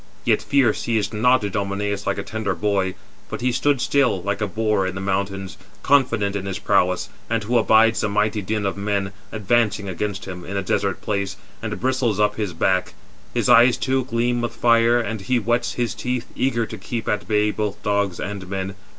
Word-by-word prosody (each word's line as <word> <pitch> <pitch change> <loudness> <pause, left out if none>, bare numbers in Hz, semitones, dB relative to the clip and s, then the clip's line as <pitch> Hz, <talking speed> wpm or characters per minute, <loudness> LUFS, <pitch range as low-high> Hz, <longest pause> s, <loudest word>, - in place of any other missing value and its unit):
Yet - - +3
fear 130 -6 +3
seized 110 -2 -1
not 125 +2 +3
Idomeneus 100 0 -2
like - - 0
a - - -3
tender 110 -4 -3
boy, 100 -3 0 0.3
but - - -5
he 125 +1 +2
stood 145 +2 +1
still, 130 -6 +2
like 100 +2 -2
a 105 - +1
boar 105 -1 0
in 95 - -4
the - - -4
mountains, 95 0 -2 0.3
confident 115 -8 +2
in 100 -1 -3
his 95 -1 -3
prowess, 90 -2 +1 0.2
and 115 -1 0
who 120 +3 -1
abides 110 0 +4
the 110 - 0
mighty 105 +1 +1
din 105 +1 -2
of 100 - -1
men 100 -1 -1 0.2
advancing 105 -1 +1
against 100 +2 -3
him, 90 -2 -7
in 100 +2 -5
a 100 - -1
desert 100 0 -1
place, 100 -2 -2 0.3
431 - - -4
and - - -4
bristles 125 -4 +1
up 105 0 +2
his 105 -5 -3
back; 95 +2 0 0.4
his - - +1
eyes, 120 0 +6
too, 130 -1 0
gleam 120 0 0
with 120 - -3
fire, 115 0 +4
and 110 -2 -3
he 115 +6 0
whets 120 +1 0
his 120 -1 -1
teeth, 125 -1 -3
eager 120 -3 +1
to 110 -1 -8
keep 115 +4 -5
at 105 -1 -1
bay 105 -1 +2
both 105 -1 -3
dogs 100 -3 0
and 100 -2 -5
men. 95 0 -3
105 Hz, 200 wpm, -22 LUFS, 100-115 Hz, 0.4 s, eyes